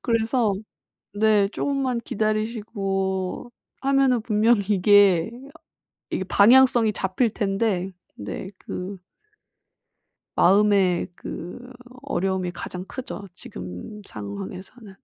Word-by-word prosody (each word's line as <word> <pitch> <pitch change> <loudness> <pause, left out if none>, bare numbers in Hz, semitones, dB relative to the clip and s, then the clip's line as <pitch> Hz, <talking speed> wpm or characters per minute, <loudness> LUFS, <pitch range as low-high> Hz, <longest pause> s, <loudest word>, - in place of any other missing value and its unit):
그래서 230 -1 +1 0.6
네 210 -1 +3
조금만 265 0 -1
기다리시고 210 -3 -2 0.3
하면은 270 -3 +3
분명히 220 0 +3
이게, 200 -2 +5 0.8
이게 190 - -2
방향성이 230 +3 +5
잡힐 200 +5 0
텐데. 195 -2 -1 0.3
네, 100 - -5
그 185 +1 -6 1.4
마음의 195 -2 +4
그 210 +9 -8 0.4
어려움이 190 -8 -1
가장 180 +1 -7
크죠. 245 -5 -7
지금 90 - -9
상황에서는. 110 - -8
205 Hz, 205 characters per minute, -24 LUFS, 185-230 Hz, 1.4 s, 이게